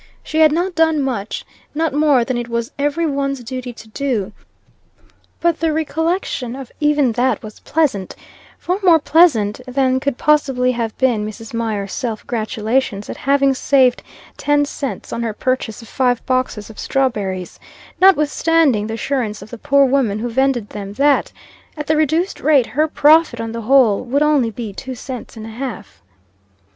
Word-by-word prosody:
She 310 - -2
had 310 -1 +6
not 355 +4 0
done 320 -2 +2
much 245 -7 -3 0.3
not 320 -1 0
more 290 -5 +3
than 255 - -2
it 240 0 -3
was 235 0 -2
every 290 +4 0
one's 275 -3 -2
duty 255 +1 -5
to 225 - -13
do; 230 -5 -2 1.1
but 340 -2 +1
the 325 -1 +1
recollection 320 -4 -2
of 265 -3 -9
even 295 -4 +2
that 250 +3 0
was 215 -1 -10
pleasant, 265 - -1 0.4
far 360 +3 -2
more 350 -4 +6
pleasant 285 -10 +3
than 260 0 +1
could 270 -1 -2
possibly 270 -4 +2
have 230 -3 -3
been 245 -5 +1
Mrs. 215 +2 -8
Mier's 215 -4 -2
self 230 -4 -4
gratulations 220 -1 -2
at - - -6
having 275 0 +2
saved 260 -1 +3 0.4
ten 290 0 +2
cents 280 -2 -5
on 235 - -3
her 225 -2 -2
purchase 245 -1 -2
of - - -13
five 245 -1 0
boxes 255 -5 -1
of 215 - -14
strawberries, 205 -9 -2 0.4
notwithstanding 315 - +3
the 220 - -4
assurance 230 -5 -2
of 215 - -14
the 240 - -7
poor 280 +3 +4
woman 255 -6 +1
who 240 +3 -3
vended 255 -3 +1
them, 200 -1 -7
that, 280 +5 +2 0.5
at 300 - -4
the 315 - +1
reduced 315 +5 0
rate, 285 -5 +4
her 300 +8 0
profit 305 -4 +4
on 225 0 -4
the 230 0 -5
whole 240 -3 +4
would 275 +4 +1
only 295 -6 +2
be 220 -2 -6
two 260 +5 -7
cents 250 -1 -8
and 220 - -7
a - - -8
half. 230 -3 -7
260 Hz, 170 wpm, -18 LUFS, 225-295 Hz, 1.1 s, had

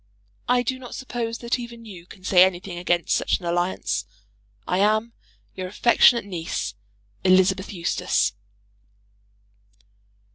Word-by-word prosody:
I 250 0 +3
do 260 +2 -2
not 250 -2 -9
suppose 240 -3 -4
that 240 +1 -2
even 235 -1 -9
you 180 -5 -11
can 185 -2 -15
say 185 -1 +6
anything 180 -1 -1
against 175 -1 0
such - - +1
an 180 - -10
alliance. 170 - -1 0.6
I 180 - 0
am, 215 +3 +2 0.4
your 185 -1 -5
affectionate 235 +3 +4
niece, 170 - -4 0.5
ELI. 185 0 +6 0.3
EUSTACE. 180 - 0
190 Hz, 120 wpm, -24 LUFS, 180-235 Hz, 0.6 s, say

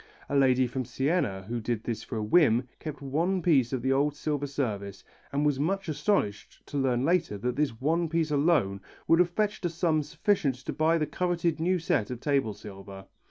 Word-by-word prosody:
A 140 - -1
lady 130 -2 +4
from 130 +2 -3
Siena 135 - -1
who 120 +5 -4
did 110 0 -2
this 115 -2 -3
for 115 - -6
a 110 - -2
whim, 125 -1 +4
kept 150 -2 -7
one 170 +7 0
piece 135 -9 +3
of 130 -3 -2
the 130 0 +2
old 145 +2 +1
silver 145 -1 -2
service 105 -8 -3 0.3
and 145 +2 0
was 145 -2 +1
much 195 +6 -1
astonished 155 - -1
to 145 - -5
learn 130 -1 +1
later 170 - +1
that 125 +5 -2
this 140 -6 -1
one 165 +4 +1
piece 165 -1 0
alone 140 - +2 0.3
would 165 - +5
have 180 -1 +4
fetched 210 +3 -1
a 175 - +1
sum 165 -2 +1
sufficient 155 - 0
to 130 - -6
buy 160 +2 +2
the 155 - 0
coveted 170 0 -1
new 180 +3 +2
set 160 - 0
of 125 -2 -5
table 135 -7 0
silver. 95 -1 -10
140 Hz, 205 wpm, -28 LUFS, 120-165 Hz, 0.3 s, would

